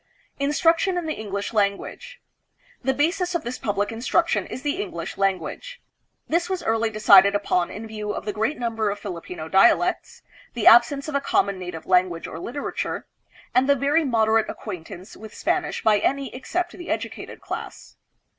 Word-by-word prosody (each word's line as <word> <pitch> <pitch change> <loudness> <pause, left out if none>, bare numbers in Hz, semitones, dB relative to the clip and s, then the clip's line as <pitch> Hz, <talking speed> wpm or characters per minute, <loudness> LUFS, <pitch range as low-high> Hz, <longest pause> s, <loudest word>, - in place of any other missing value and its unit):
Instruction 330 +6 +2
in 350 - -2
the 310 - -1
English 200 0 -5
Language 215 - -2 0.6
The 265 - +2
basis 350 +5 0
of 340 - -1
this 240 +2 -5
public 205 0 -1
instruction 260 +9 0
is 255 - -7
the 295 +6 -1
English 170 - -5
language. 195 - -2 0.5
This 340 +2 0
was 375 -1 -2
early 225 0 +1
decided 200 -2 +6
upon 180 -3 +1
in 215 +2 -7
view 215 -1 -6
of - - -5
the 210 - -2
great 220 +8 -1
number 225 -3 -1
of 200 - -3
Filipino 175 -4 -7
dialects, 235 - +3 0.3
the 230 - -2
absence 240 +5 +6
of 310 - -5
a 280 - +1
common 200 -7 +1
native 180 -3 -7
language 180 -2 +2
or 160 - -7
literature, 265 +10 -4 0.5
and 260 +2 +3
the 280 - +6
very 285 +5 +2
moderate 225 -4 +2
acquaintance 185 -1 -8
with 220 -1 -11
Spanish - - -1
by 210 -2 +4
any 275 +3 -1
except 345 +7 -3
the 350 -2 -10
educated - - -4
class. - - -7
225 Hz, 165 wpm, -24 LUFS, 200-295 Hz, 0.6 s, decided